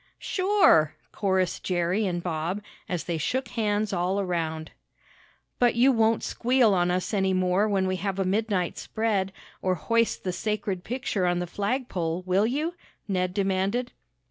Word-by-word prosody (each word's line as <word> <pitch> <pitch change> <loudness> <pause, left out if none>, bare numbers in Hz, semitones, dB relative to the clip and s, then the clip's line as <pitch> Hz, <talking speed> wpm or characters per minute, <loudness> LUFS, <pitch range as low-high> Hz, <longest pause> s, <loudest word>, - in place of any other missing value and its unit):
"Sure!" 370 - +3 0.2
chorused 190 -3 0
Jerry 180 +3 0
and 175 -1 -2
Bob, 175 +4 -2 0.3
as 180 -2 -2
they 170 -2 -2
shook 255 - -1
hands 210 -2 0
all 180 +3 0
around. 165 -4 -2 0.9
"But 245 -1 +4
you 250 +3 +5
won't 225 -2 +2
squeal 245 -3 +2
on 175 -1 +2
us 180 +4 -1
any 190 -2 +2
more 185 +3 +2
when 195 -2 +1
we 185 0 0
have 195 +1 -2
a 195 - 0
midnight 195 -2 0
spread, 210 -4 -1 0.3
or 185 -1 +1
hoist 230 +6 0
the 185 - -2
sacred 205 -3 -2
picture 225 -6 -1
on 175 0 +1
the 175 - -1
flagpole; 185 -4 -2
will 190 +4 +2
you?" 300 +8 -1 0.3
Ned 185 -2 0
demanded. 195 +5 0
195 Hz, 155 wpm, -26 LUFS, 180-220 Hz, 0.9 s, you